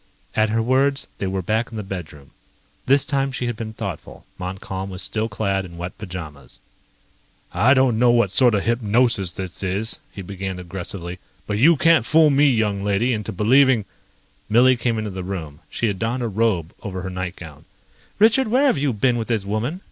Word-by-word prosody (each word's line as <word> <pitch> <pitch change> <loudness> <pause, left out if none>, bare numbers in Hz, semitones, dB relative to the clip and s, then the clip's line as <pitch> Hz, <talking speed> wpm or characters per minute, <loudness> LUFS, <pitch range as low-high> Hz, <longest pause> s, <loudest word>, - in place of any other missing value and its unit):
At 110 0 +2
her 115 +1 +1
words, 135 +3 +2
they 95 - -2
were 95 0 -2
back 110 +5 0
in 115 - -8
the 105 - -4
bedroom. 85 -7 -8 0.6
This 135 +1 +4
time 135 -2 0
she 125 - -3
had 120 -1 -2
been 110 0 -6
thoughtful. - - -7
Montcalm 95 +1 -5
was 95 0 -3
still 110 +1 -1
clad 100 -2 -1
in 85 -2 -11
wet 90 +2 -6
pajamas. 80 - -7 1.0
"I 130 +4 +4
don't 130 -4 +3
know 125 0 +5
what 120 -5 +3
sort 120 0 +4
of 100 - 0
hypnosis 115 -4 +1
this 95 -2 -5
is," 100 +4 -1
he 100 - -8
began 95 0 -5
aggressively, 90 0 -6 0.3
"but 105 0 -2
you 160 +6 +6
can't 165 -2 +4
fool 155 +4 +4
me, 145 +1 +4
young 105 -5 0
lady, 105 +5 +1
into 105 -3 -3
believing 120 +3 +4 0.3
..." - - -38
Millie 125 +4 +5
came 120 -1 -1
into 110 -1 -3
the 95 -1 -6
room. 80 -6 -6
She - - -2
had 100 -4 -1
donned 120 +2 -1
a - - 0
robe 105 -6 0
over 95 -3 -5
her 95 - -5
nightgown. 90 -4 -7 0.5
"Richard, 225 +5 +4
where 255 +6 +3
have 260 - +3
you 140 -2 0
been 120 +3 +1
with 115 - -3
this 110 -5 -1
woman?" 110 - -2
110 Hz, 195 wpm, -22 LUFS, 95-125 Hz, 1.0 s, you